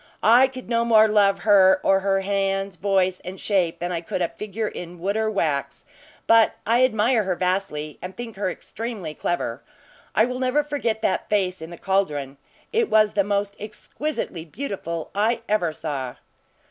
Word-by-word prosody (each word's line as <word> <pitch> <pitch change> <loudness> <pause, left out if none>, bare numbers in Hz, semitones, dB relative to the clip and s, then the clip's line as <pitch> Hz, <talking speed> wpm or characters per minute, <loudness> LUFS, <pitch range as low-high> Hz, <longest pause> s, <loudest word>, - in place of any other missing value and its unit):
I 240 +4 +6
could 255 -1 -10
no 230 0 +1
more 220 -2 +6
love 200 -3 +3
her 190 -2 +5
or 195 0 +4
her 195 0 +1
hands, 195 0 -1
voice, 185 0 +1
and 185 +1 -8
shape, 185 -5 0
than 175 +1 -3
I 170 -2 -2
could 170 - -4
a 170 - 0
figure 210 +5 -4
in 175 -2 -7
wood 195 +4 -2
or 220 0 +1
wax; 155 -9 -2 0.4
but 225 -1 +5
I 235 +3 +3
admire 230 -1 +3
her 190 -3 -1
vastly, 180 -5 -2
and 185 +1 -8
think 235 -2 -7
her 195 -1 -1
extremely 210 -4 -6
clever. 145 -7 -3 0.5
I 220 - +5
will 250 +1 -4
never 260 +3 +1
forget 275 -7 -2
that 185 - 0
face 185 -4 0
in 160 - -7
the 170 - -9
caldron. 150 -9 -1 0.4
It 455 -1 +2
was 215 -1 +4
the 200 - +2
most 200 0 -1
exquisitely 215 - -5
beautiful 170 - -5
I 225 +3 +1
ever 180 -6 +1
saw." 140 -5 -5
200 Hz, 175 wpm, -23 LUFS, 180-220 Hz, 0.5 s, I